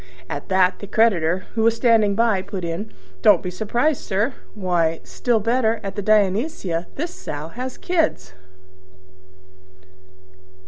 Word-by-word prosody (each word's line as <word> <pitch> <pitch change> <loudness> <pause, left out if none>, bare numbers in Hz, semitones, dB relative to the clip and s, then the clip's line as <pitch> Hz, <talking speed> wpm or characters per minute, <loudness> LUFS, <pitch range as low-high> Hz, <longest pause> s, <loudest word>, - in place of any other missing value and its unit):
At 145 - -6
that 185 -1 +3
the 200 - -8
creditor, 185 -6 +2
who 225 - -1
was 230 +1 +3
standing 225 -4 +3
by, 225 -3 +2
put 190 -2 -5
in, 170 +6 -4 0.3
"Don't 200 -5 +5
be 180 - -3
surprised, 240 +10 0
sir; 210 +6 -1 0.2
why, 175 -5 0
still 240 -3 0
better, 230 0 +1
at 195 -1 -5
the 205 - -2
Dionysia 200 - +1
this 340 +5 -4
Sow 150 - -6
has 250 +7 -6
kids!" 205 - -1
205 Hz, 135 wpm, -22 LUFS, 180-230 Hz, 0.3 s, Don't